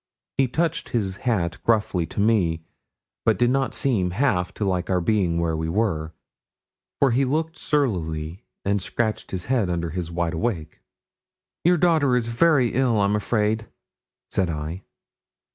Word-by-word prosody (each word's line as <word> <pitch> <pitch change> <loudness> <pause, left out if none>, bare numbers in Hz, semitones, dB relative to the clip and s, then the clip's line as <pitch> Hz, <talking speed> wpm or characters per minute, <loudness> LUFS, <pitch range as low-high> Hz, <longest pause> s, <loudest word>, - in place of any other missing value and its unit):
He 135 - +4
touched 165 +6 -1
his 100 -5 -1
hat 85 -7 0
gruffly 105 -7 +1
to - - -6
me, 95 -7 +2 0.6
but 110 - +3
did 120 0 +3
not 135 0 0
seem 105 -10 +1
half 90 -3 +1
to 105 - -2
like 90 -2 -1
our 90 -1 +2
being 90 -3 +1
where 85 -1 0
we 80 0 -2
were, 85 -5 0 0.9
for 140 -3 +4
he 130 +4 +3
looked 160 +5 -1
surlily, 90 - -1 0.2
and 100 0 +1
scratched 110 +3 -2
his 90 -2 -4
head 120 -7 +1
under 85 -1 -2
his 85 0 -4
wide 85 0 -1
awake. 80 -4 -3 0.8
'Your 175 +1 +4
daughter 155 -6 +3
is 120 -2 0
very 130 0 +3
ill, 120 -3 +2
I'm 100 +1 +2
afraid,' 110 +1 0 0.6
said 95 -2 +1
I. 80 +3 -4
105 Hz, 155 wpm, -24 LUFS, 85-125 Hz, 0.9 s, He